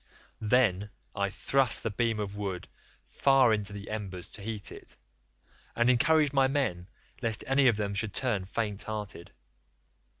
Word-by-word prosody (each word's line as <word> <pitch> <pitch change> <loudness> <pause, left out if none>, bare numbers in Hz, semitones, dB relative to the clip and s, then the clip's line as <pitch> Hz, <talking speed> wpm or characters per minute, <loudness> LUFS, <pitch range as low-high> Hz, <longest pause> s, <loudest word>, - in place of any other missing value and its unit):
Then 105 -3 +2 0.3
I 100 0 0
thrust 135 +5 +1
the 115 - -1
beam 115 +1 0
of 100 -1 -4
wood 100 -3 -4 0.4
far 135 -4 +4
into 105 -1 -2
the 100 0 -7
embers 95 -4 -5
to - - -8
heat 105 -1 -4
it, - - -12 0.8
and 120 +2 +4
encouraged 150 +3 +3
my 135 -1 +4
men 125 -11 -1 0.3
lest 115 -3 -1
any 135 0 +4
of 115 -4 +4
them 100 -1 -2
should 100 0 -3
turn 110 -8 0
faint 105 0 -3
hearted. 105 -5 -6
110 Hz, 155 wpm, -29 LUFS, 100-125 Hz, 0.8 s, far